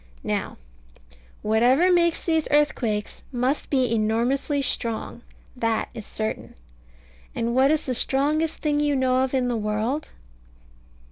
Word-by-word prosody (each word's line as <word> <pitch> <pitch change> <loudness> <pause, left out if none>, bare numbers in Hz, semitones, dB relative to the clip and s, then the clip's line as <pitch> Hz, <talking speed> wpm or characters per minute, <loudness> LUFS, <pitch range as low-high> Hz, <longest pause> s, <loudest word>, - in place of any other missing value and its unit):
Now, - - -3 0.9
whatever 250 +11 +4
makes 340 -2 +2
these 320 -2 +1
earthquakes 240 -8 0
must 255 +3 -1
be 255 -4 +1
enormously 235 +6 0
strong; 230 -1 -1 0.3
that 230 -3 -1
is 220 - -8
certain. 215 0 -4 0.8
And 235 +1 -1
what 260 +2 +4
is 310 0 +1
the 255 - -2
strongest 295 +6 0
thing 295 -1 +1
you 295 -1 +1
know 260 -1 +2
of 265 0 0
in 255 -1 +1
the 245 - -1
world? 220 +7 -2
260 Hz, 130 wpm, -24 LUFS, 230-295 Hz, 0.9 s, whatever